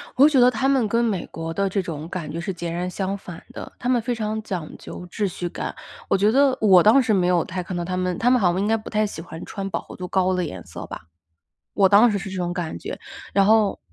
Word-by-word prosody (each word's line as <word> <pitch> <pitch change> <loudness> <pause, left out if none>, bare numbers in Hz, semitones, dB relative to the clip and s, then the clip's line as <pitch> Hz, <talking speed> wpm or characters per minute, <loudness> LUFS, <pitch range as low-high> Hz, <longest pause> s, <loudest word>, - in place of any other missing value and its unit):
我 265 - +5
会 300 - +8
觉 275 - +3
得 245 0 +7
他 250 +2 0
们 265 -5 +3
跟 230 +3 +1
美 205 -7 -1
国 165 0 -5
的 200 +2 0
这 195 +1 0
种 160 -3 -6
感 180 -4 -5
觉 165 - -4
是 190 +3 -3
截 170 -1 -5
然 175 +2 -2
相 195 +1 -3
反 175 -4 -10
的。 - - -8
他 245 - -2
们 245 -2 +3
非 245 +2 -2
常 220 -1 -2
讲 180 -7 -5
究 180 - -9
秩 205 +3 -2
序 175 -1 -4
感。 - - -5 0.3
我 - - +3
觉 205 +3 +3
得 270 +1 +4
我 190 -5 +7
当 220 +8 +6
时 240 -4 +1
没 185 -3 +2
有 175 -2 +3
太 185 0 -4
看 180 +1 -6
到 175 - -2
他 185 +1 -3
们， 185 -1 -1
他 240 - +2
们 250 0 +4
好 180 -5 +3
像 185 - -1
应 205 - 0
该 225 +1 +2
不 215 - -9
太 215 0 +1
喜 200 -6 -6
欢 165 -1 -9
穿 195 -1 -5
饱 - - -2
和 - - -12
度 180 - -6
高 185 0 +1
的 180 -1 0
颜 95 - -7
色 - - -8
吧。 - - -8 0.7
我 195 -2 +5
当 215 +4 +6
时 205 - 0
是 195 0 -6
这 190 - -6
种 175 -1 -2
感 170 - -4
觉。 - - -7 0.3
然 195 -1 +4
后 215 -1 +3
195 Hz, 305 characters per minute, -23 LUFS, 175-220 Hz, 0.7 s, 会